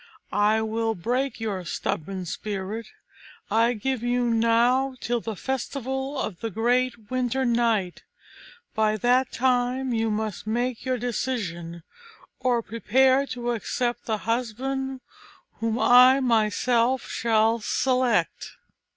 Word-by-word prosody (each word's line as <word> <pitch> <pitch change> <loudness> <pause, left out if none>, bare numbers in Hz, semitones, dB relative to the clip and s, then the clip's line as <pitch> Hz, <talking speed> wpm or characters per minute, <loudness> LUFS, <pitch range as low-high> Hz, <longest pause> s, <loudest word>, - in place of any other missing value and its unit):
I 215 +2 +3
will 225 0 -1
break 250 +8 -2
your 205 -5 -3
stubborn 185 +2 -3
spirit. 205 +4 -5 0.6
I 230 +2 +3
give 250 +2 -2
you 245 0 +1
now 240 +4 +2
till 240 0 -1
the 225 -1 -5
festival 265 +3 -3
of 190 -9 -4
the 225 - -3
great 240 +1 0
Winter 255 +1 0
night; 230 -6 +1 0.7
by 215 0 +1
that 250 +4 +2
time 250 +1 0
you 225 -1 0
must 215 -1 -3
make 240 +2 -2
your 255 -1 0
decision, 195 -10 -3 0.6
or 245 -2 +1
prepare 260 +5 +2
to 240 -2 -3
accept 240 +2 -2
the 220 -2 -1
husband 255 +3 -2 0.6
whom 225 0 -1
I 250 +2 +7
myself 240 +1 +2
shall 225 0 +2
select." 250 -5 0
235 Hz, 115 wpm, -25 LUFS, 220-255 Hz, 0.7 s, I